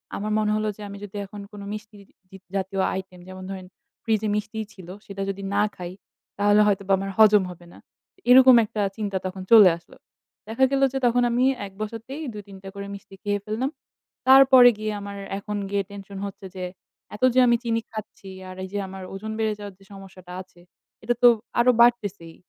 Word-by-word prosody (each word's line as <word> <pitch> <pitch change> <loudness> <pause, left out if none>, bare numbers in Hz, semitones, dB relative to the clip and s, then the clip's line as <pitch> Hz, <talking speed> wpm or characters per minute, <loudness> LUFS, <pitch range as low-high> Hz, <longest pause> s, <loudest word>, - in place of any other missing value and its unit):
আমার 210 +1 -3
মনে 210 -1 +1
হলো 215 0 -1
যে - - -12
আমি 200 - -8
যদি 205 - -14
এখন 205 +1 -10
কোন 205 - -9
মিষ্টি 215 0 -9 0.3
জ - - -21 0.2
জাতীয় 195 0 -1 0.2
item 185 -1 -12
যেমন 185 0 -9
ধরেন 190 -1 -7 0.4
fridge 220 -2 0
এ - - 0
মিষ্টি 210 +1 -4
ছিল 185 -3 -13 0.2
সেটা 195 0 -6
যদি 195 0 -5
না 205 - +3
খাই, 175 -1 -7 0.5
তাহলে 205 +1 +5
হয়তোবা 200 -1 +1
আমার 195 +1 -4
হজম 210 -2 +6
হবে 175 0 -14
না। - - -15 0.5
এরকম 255 0 +9
একটা 210 0 -4 0.2
চিন্তা 205 -3 -2
তখন 185 0 -5
চলে 215 -5 +9
আসলো। 170 - -19 0.5
দেখা 230 +4 +3
গেল 275 0 +1
যে - - -1
তখন 245 +1 +3
আমি 245 +2 +2 0.2
এক 195 - -10
বসাতেই 230 +7 -6
২ 210 - -7
৩ 195 -1 -11
টা 195 - -7
করে 200 0 -6
মিষ্টি 200 0 -13
খেয়ে 205 -1 0
ফেললাম। 225 +5 -2 0.6
তারপরে 260 -2 +8
গিয়ে 215 0 -2
আমার 200 0 -7 0.2
এখন 210 +1 -5
গিয়ে 200 0 0
tension 200 0 -9
হচ্ছে 195 0 -11
যে 185 - -4 0.5
এত 210 - -8
যে - - +6
আমি 235 - +5
চিনি 230 -1 0
খাচ্ছি, 215 -2 -9 0.2
আর 185 - -9
এই 190 - -6
যে - - -2
আমার 190 0 -9
ওজন 215 +3 -6
বেড়ে 220 -1 +1
যাওয়ার 205 -1 -8
যে 195 - -19
সমস্যাটা 185 -2 -12
আছে। 180 - -18 0.4
এটা 240 - +1
তো - - +10 0.3
আরও 245 +1 +6
বাড়তেছেই। 205 -8 +2
205 Hz, 200 wpm, -24 LUFS, 195-220 Hz, 0.6 s, তো